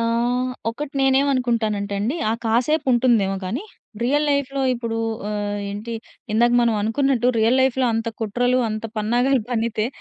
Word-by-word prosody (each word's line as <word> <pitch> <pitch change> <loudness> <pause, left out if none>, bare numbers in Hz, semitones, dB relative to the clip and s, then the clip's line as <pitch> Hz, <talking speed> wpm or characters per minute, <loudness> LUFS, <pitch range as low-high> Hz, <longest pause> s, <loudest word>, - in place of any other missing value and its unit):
ఆహ్, 240 +2 0 0.2
ఒకటి 280 +5 -6
నేనేమనుకుంటానంటే 245 -7 +1
అండి. 235 +10 -1
ఆ - - +2
కాసేపు 250 +8 +1
ఉంటుందేమో 230 -6 +2
గానీ 230 - -3 0.4
రియల్ 290 +5 +2
లైఫ్‌లో 280 -1 0
ఇప్పుడు 230 -1 -3 0.3
ఆహ్, 205 -1 -2
ఏంటి 210 +3 -6 0.4
ఇందాక 240 +2 +3
మనం 235 -2 +2
అనుకున్నట్టు 245 +3 +1
రియల్ 225 +3 +3
లైఫ్‌లో 260 -1 +2
అంత 225 +1 -1
కుట్రలు 245 +4 +1
అంత 215 +1 -4
పన్నాగాలు 245 +5 +2
పన్నితే 225 -2 0
235 Hz, 140 wpm, -22 LUFS, 220-260 Hz, 0.4 s, ఇందాక